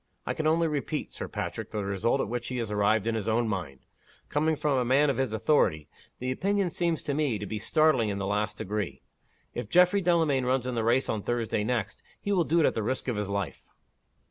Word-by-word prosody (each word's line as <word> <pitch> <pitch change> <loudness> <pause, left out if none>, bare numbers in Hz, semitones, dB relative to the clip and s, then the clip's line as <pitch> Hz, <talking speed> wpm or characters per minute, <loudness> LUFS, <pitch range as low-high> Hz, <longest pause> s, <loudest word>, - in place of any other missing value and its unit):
I - - -1
can 155 - -1
only 165 +1 +3
repeat, 145 -6 -3
Sir - - -5
Patrick, - - -4
the 105 -2 -3
result 100 +7 +1
at - - -2
which 120 +2 -3
he 125 - -3
has 115 -3 -3
arrived 105 +1 +2
in 115 - 0
his 110 -2 -3
own 115 +1 +2
mind. 85 -11 -4 0.4
Coming 155 +2 +1
from 145 -3 +1
a - - +2
man 140 +4 +4
of 130 - -4
his 130 -3 0
authority, 105 - +2 0.3
the 125 +1 -2
opinion 195 +5 0
seems 170 -2 -1
to 145 - -2
me 140 -6 +1
to 105 - -5
be 110 +1 -4
startling 155 -4 +3
in 100 - -2
the 100 - -2
last 105 +2 -1
degree. 105 -1 -4 0.5
If 120 -3 -5
Geoffrey 180 +5 +5
Delamayn 165 -7 +2
runs 125 0 +1
in 125 - -2
the 115 -2 -1
race 120 +4 +2
on 110 - -1
Thursday 115 -2 -1
next, 110 -3 -2 0.2
he 205 - -3
will 180 -4 +3
do 165 +2 +3
it - - +4
at - - +3
the 110 - -2
risk 130 +6 -2
of 125 - 0
his 105 -1 -2
life." 100 -2 -4
120 Hz, 235 wpm, -28 LUFS, 105-150 Hz, 0.5 s, Geoffrey